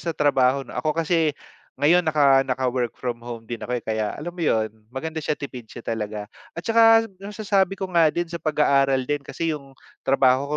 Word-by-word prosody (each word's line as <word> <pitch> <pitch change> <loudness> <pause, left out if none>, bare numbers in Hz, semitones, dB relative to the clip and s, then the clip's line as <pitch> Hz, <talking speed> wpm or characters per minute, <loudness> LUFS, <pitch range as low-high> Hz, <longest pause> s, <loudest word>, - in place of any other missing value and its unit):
sa 165 -2 -4
trabaho 135 -2 +2
'no. 120 - -12
Ako 155 +3 -1
kasi 160 -2 +1 0.4
ngayon 155 +6 +4
naka 140 -3 +5
naka-work 125 -2 -1
from 120 -2 -4
home 115 -1 -8
din 115 0 -6
ako, 125 0 -2
eh, - - -6
kaya 110 -1 -2
alam 170 +4 -6
mo 175 - -9
'yun, 110 -8 +1 0.2
maganda 160 +5 -5
siya, 150 0 -1
tipid 125 -5 -8
siya 120 - -10
talaga 105 -2 -3 0.3
at 170 - -6
saka 225 0 +6 0.2
masasabi 200 -2 0
ko 190 - -3
nga 165 -2 +5
din 175 +3 -1
sa 170 0 -7
pag-aaral 140 -4 +2
din 145 +1 -1
kasi 165 +3 -3
'yung 135 -3 -9 0.2
trabaho 135 +2 +2
140 Hz, 195 wpm, -23 LUFS, 125-165 Hz, 0.4 s, saka